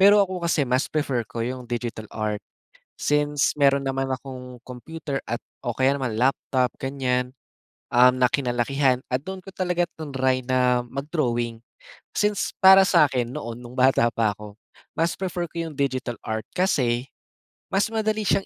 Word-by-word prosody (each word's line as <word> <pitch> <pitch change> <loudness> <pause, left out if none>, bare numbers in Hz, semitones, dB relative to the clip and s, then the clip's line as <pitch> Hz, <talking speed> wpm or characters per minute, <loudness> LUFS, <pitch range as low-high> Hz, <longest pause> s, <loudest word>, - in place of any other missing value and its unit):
Pero 200 +2 +8
ako 185 -1 -5
kasi 170 -4 +1
mas 125 +1 0
prefer 140 -5 0
ko 115 -1 -3
yung 125 -1 -5
digital 120 -3 -4
art, 105 -1 -3 0.6
since 150 -1 +1
meron 140 -1 +3
naman 135 0 -1
akong 130 -1 -6
computer 140 +3 -5
at 120 +1 -3 0.2
o 120 -3 -3
kaya 130 +1 +3
naman 130 -6 -2
laptop 130 0 +1
gan'yan, 130 -1 -1 0.6
um, 125 +1 +6
na 125 - +5
kinalakihan 130 +1 +1 0.2
at 130 - 0
doon 190 +2 -6
ko 195 +1 -12
talaga 180 -1 0
triny 130 -4 -1
na 125 -1 +2
mag-drawing. 120 -6 -2 0.5
Since 210 -1 0
para 190 0 +9
sa'kin 130 -9 +3
noon 115 +1 -5
nung 125 0 -11
bata 130 -2 +4
pa 110 -2 +1
ako, 105 -1 -11 0.4
mas 165 +1 +1
prefer 180 -2 -2
ko 165 -1 -3
yung 150 - -9
digital 130 -3 -1
art 110 0 -3
kasi 130 -9 +1 0.7
mas 200 +3 +2
madali 220 -1 0
siyang 195 0 +2
130 Hz, 155 wpm, -24 LUFS, 125-155 Hz, 0.7 s, para